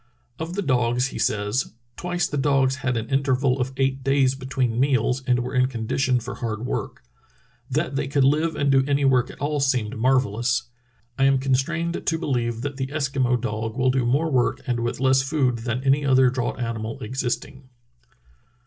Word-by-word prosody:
Of 165 +2 -4
the 200 - -1
dogs 125 -2 +1
he - - -7
says: 105 +4 0 0.2
"Twice 175 -1 -1
the 150 - -4
dogs 135 -2 +2
had 130 -2 -1
an 115 0 -3
interval 135 -1 +1
oT 130 +1 -1
eight 135 0 0
days 135 -1 +3
between 130 -3 -2
meals 130 -1 +2
and 125 -1 +3
were 125 - -5
in 125 0 +3
condition 130 +1 0
for 120 +3 -6
hard 115 -1 -4
work. - - -4 0.7
That 150 +2 -1
they 135 - -1
could 140 0 +2
Hve 155 +4 +2
and 140 -1 +1
do 135 -1 +4
any 140 0 +2
work 125 -2 +3
at - - -11
all 145 +1 -1
seemed 125 -4 0
marvellous. 125 0 +1 0.6
I 135 - +4
am 135 0 +4
constrained 150 +6 -1
to 165 - 0
believe 120 -7 -1
that 145 +1 -4
the 130 -1 -2
Eskimo 135 -4 0
dog 110 0 -3
will 130 0 +3
do 130 -1 +1
more 145 +7 +1
work, 125 -3 +1
and 120 -2 -1
with 120 0 -2
less 130 0 +4
food, 135 -4 0
than 120 +2 -3
any 140 +2 +3
other 130 -2 +4
draught 130 0 -2
animal 115 -2 -4
existing." 130 +2 -4
130 Hz, 185 wpm, -23 LUFS, 120-140 Hz, 0.7 s, do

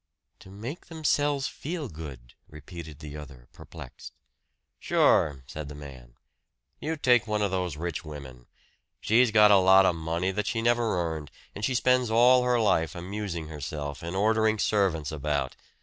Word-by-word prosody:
"To - - -15
make 115 - -8
themselves 145 -3 0
feel 155 -1 -5
good," 70 - -10 0.2
repeated 75 +1 -10
the 75 -1 -8
other 65 -5 -11
perplexed. - - -11 0.7
"Sure!" 70 -3 +2
said 75 +2 -7
the 75 - -9
man. 65 -5 -12 0.6
"You 160 +2 -2
take 125 -5 +3
one 105 -1 0
of 100 - 0
those 90 -5 -2
rich 85 0 -4
women 70 -6 -10 0.5
she's 115 +3 +3
got 105 -1 +6
a 100 - +8
lot 95 0 +6
of 90 - +3
money 85 +3 -2
that 105 +2 -3
she 125 -2 -1
never 115 -4 +1 0.2
earned, 75 -3 -8 0.2
and 105 - -8
she 125 +4 0
spends 125 -1 +2
all 125 +3 +5
her 125 -1 +2
life 80 -8 +1
amusing 90 -2 -5
herself 75 -1 -6
and 85 +2 -5
ordering 110 +2 +2
servants 95 -8 0
about. 75 -1 -2
95 Hz, 160 wpm, -27 LUFS, 75-115 Hz, 0.7 s, a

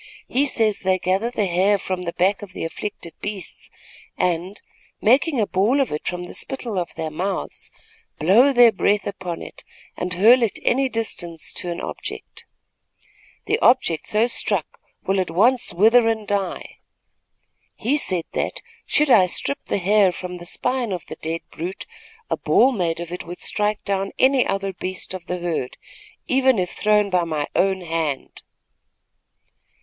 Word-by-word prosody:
He 280 +3 +1
says 220 -5 +2
they 185 -1 +1
gather 190 +5 0
the 230 -4 -1
hair 190 +3 +2
from 185 -1 -4
the 170 -1 -4
back 195 +4 +1
of 200 -2 -10
the - - -4
afflicted 170 0 -6
beasts 200 -4 -6 0.5
and, 180 +3 -1 0.4
making 265 +5 +3
a 215 - +3
ball 210 +9 +1
of 270 - +1
it 150 - -4
from 180 0 -3
the 175 - -9
spittle 240 -7 -2
of 175 - -5
their 160 -1 -4
mouths, 190 +5 -4 0.5
blow 215 - +5
their 245 -3 +7
breath 205 -1 +1
upon 185 -4 -5
it - - -11 0.3
and 180 0 -3
hurl 230 +7 +6
it 230 -4 0
any 265 +1 +2
distance 175 -8 -3
to 175 - -3
an 170 - -4
object. - - -7 1.0
The 440 - 0
object 170 - +3
so 215 +2 +3
struck 240 - 0 0.2
will 195 0 0
at 185 - -1
once 230 +9 +3
wither 225 +6 +5
and 220 -2 -1
die. 200 -3 -3 1.0
He 260 +6 0
said 180 - 0
that, - - -3 0.2
should 300 -2 +2
I 190 -6 +6
strip 280 +10 -1
the - - -1
hair 200 0 +4
from 180 0 -7
the 175 0 -7
spine 250 +2 0
of 180 -2 -4
the - - -8
dead 165 +1 -3
brute, 175 +4 -6 0.4
a - - -1
ball 260 - +4
made 170 -8 -1
of 170 0 -6
it 180 -1 -6
would 175 +1 -7
strike 210 0 0
down 195 -1 -1
any 265 -1 +4
other 195 0 -2
beast 185 +1 -5
of 185 -1 -8
the 180 - -2
herd, 170 -7 -3 0.5
even 260 -2 +3
if 180 -2 -1
thrown 210 -1 +2
by 180 -1 +2
my 155 -3 -2
own 190 -1 +2
hand." 160 -5 -3
195 Hz, 170 wpm, -22 LUFS, 175-225 Hz, 1.0 s, their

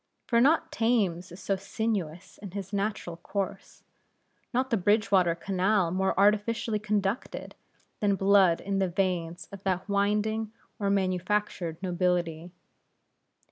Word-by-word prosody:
For 235 -1 +3
not 310 +6 +3
Thames 200 -7 +1
is 175 - -10
so 195 0 0
sinuous 195 -4 -3
in 200 - -8
his 200 0 -6
natural 200 -4 -2
course, 195 +2 -5 0.7
not 260 +1 0
the - - +4
Bridgewater 195 -3 +3
Canal 190 0 +1
more 190 +1 0
artificially 210 +2 +2
conducted, 210 +1 -2 0.5
than 200 -1 +2
blood 195 -3 +4
in 195 0 -1
the 190 -1 +1
veins 175 -1 -2
of 200 -1 -9
that 190 -1 -1
winding 210 +2 0 0.3
or 200 -1 0
manufactured 185 -2 0
nobility. 175 -2 0
195 Hz, 125 wpm, -28 LUFS, 180-210 Hz, 0.7 s, the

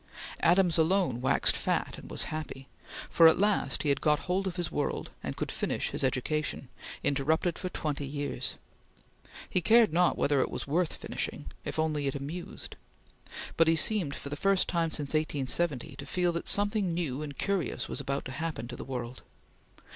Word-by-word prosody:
Adams 175 -1 +4
alone 165 -6 +2
waxed 130 - +2
fat - - -1
and - - -11
was - - -1
happy, 140 -3 -6 0.4
for 165 - +7
at 160 - +6
last 205 +1 +1
he 150 - +1
had 140 -1 +1
got 150 -1 +3
hold 190 +2 -1
of 180 - -3
his 175 -3 -2
world 145 - -2
and - - -5
could - - -2
finish - - -2
his - - -2
education, 135 +1 -1 0.3
interrupted 155 +5 +1
for 185 - -3
twenty 145 -5 -3
years. 145 +1 -3 0.9
He 185 - +1
cared 225 -1 +5
not 175 +1 +3
whether 140 -2 +3
it - - 0
were - - -4
worth 165 +4 0
finishing, - - -5
if - - -5
only 155 -2 0
it 135 - -1
amused; 150 +6 -6 0.8
but 165 - +5
he 165 - +5
seemed, 170 -5 +1
for 140 - -7
the 145 - -3
first 195 +4 +2
time 170 -2 +1
since 150 -3 -1
1870, 150 -2 0
to - - -7
feel 180 -1 +1
that 170 - -3
something 205 -4 +2
new 150 -5 -2
and 145 -2 -6
curious 195 -4 -1
was - - -2
about 140 0 -2
to 130 - -5
happen 155 -4 -4
to 125 - -5
the - - -7
world. 125 -1 -5
155 Hz, 185 wpm, -30 LUFS, 140-175 Hz, 0.9 s, for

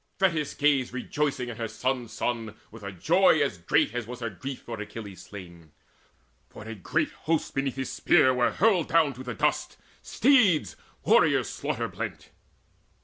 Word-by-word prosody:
Thetis 165 -7 +1
gazed 140 -4 +2
Rejoicing 130 -1 -2
in 115 - -7
her 115 - -3
son's 125 +2 -2
son, 115 -3 -3 0.2
with 115 +1 -12
a 100 0 -6
joy 160 - +3
As 135 -11 -3
great 85 +5 +1
as 120 -2 -4
was 125 0 -7
her 115 -2 -3
grief 130 +7 -7
for 115 -3 -6
Achilles 100 -3 -8
slain. 85 -5 -12 0.8
For - - -11
a 110 +1 -7
great 150 - -1 0.2
host 165 -2 0
beneath 135 -1 -1
his 135 -2 -4
spear 130 -2 +4
were 125 -1 +2
hurled 195 -5 +2
Down 160 -4 +3
to 130 +1 -9
the 125 -3 -5
dust, - - 0 0.2
steeds, 200 - +3 0.3
warriors - - +3
slaughter - - -3
blent. - - -7
125 Hz, 165 wpm, -27 LUFS, 110-150 Hz, 0.8 s, spear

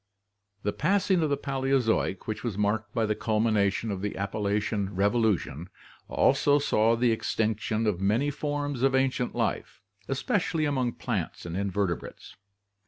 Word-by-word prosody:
The 105 - 0
passing 190 +2 +2
of 155 - +1
the 140 - +1
Paleozoic, 135 -8 0
which 110 - -4
was 115 -5 -3
marked 105 0 0
by 115 0 0
the 105 - +1
culmina 105 -2 +2
tion 110 +3 -3
of 95 -2 -4
the 105 0 -3
Appalachian 100 0 -1
Revolution, 100 - +1 0.4
also 145 0 +3
saw 115 -5 +2
tfie 120 0 +3
extinction 110 0 -1
of 100 -4 0
many 115 +9 +2
forms 145 -2 -3
of 135 0 +3
ancient 130 -2 0
life, - - -2 0.3
especially 160 - 0
among 130 -5 0
plants - - -4
and 85 0 -5
inverte 100 -2 0
brates. - - -11
110 Hz, 150 wpm, -27 LUFS, 100-135 Hz, 0.4 s, also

